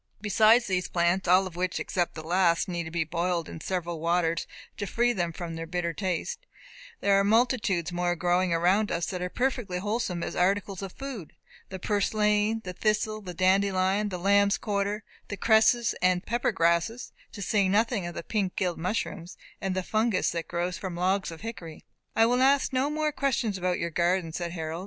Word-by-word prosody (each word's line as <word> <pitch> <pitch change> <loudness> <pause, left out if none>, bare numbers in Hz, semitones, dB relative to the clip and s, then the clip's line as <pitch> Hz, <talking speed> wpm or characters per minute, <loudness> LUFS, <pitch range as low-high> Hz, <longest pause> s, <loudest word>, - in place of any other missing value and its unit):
Beside 220 +3 +5
these 185 -4 -1
plants 175 +2 +1
(all 185 +2 +5
of 185 -3 -8
which, 180 0 -1
except 175 -2 -2
the 155 - -7
last, 170 0 +2
need 175 -2 -3
to - - -6
be 170 0 -1
boiled 170 +1 -1
in 160 - -8
several 175 -2 -3
waters 170 0 0 0.3
to 205 - -3
free 240 +4 +1
them 175 -4 -1
from 170 0 -6
their 165 0 -6
bitter 170 0 -2
taste), 190 - -3 0.5
there 200 0 +4
are - - +3
multitudes 215 -5 +2
more 175 0 0
growing 180 +1 +1
around 180 +6 +2
us 170 0 -1
that 180 -1 -4
are 180 - -2
perfectly 245 -6 -1
wholesome 200 -3 -2
as - - -4
articles 195 +1 0
of 195 -2 -5
food 260 - -7 0.4
the 190 - -6
purslain, 210 +2 +1
the 180 - -6
thistle, 215 +2 0
the 180 -3 -8
dandelion, 190 +2 +2
the 185 - -4
lambsquarter, 200 +2 +1 0.2
the 205 - -5
cresses 225 +2 +4
and 180 -1 +2
pepper 240 +1 0
grasses, 170 +6 0 0.2
to 200 - -7
say 200 -1 +2
nothing 220 +1 +1
of 175 - -7
the - - -5
pink 195 -2 -2
gilled 180 -4 -1
mushrooms, 180 -1 -3 0.2
and 190 -1 -2
the 185 - -1
fungus 215 -1 +1
that 170 -1 -4
grows 175 +1 -2
from 185 -3 -5
logs 190 +3 0
of 165 -1 -9
hickory." 175 -8 -8 0.3
"I 225 - +5
will 245 +2 +2
ask 270 +1 +3
no 260 +2 +1
more 305 0 0
questions 260 -7 0
about 180 -1 -1
your 170 - -3
garden," 175 0 0
said 170 0 -4
Harold. 160 -1 -4
185 Hz, 190 wpm, -27 LUFS, 175-215 Hz, 0.5 s, Beside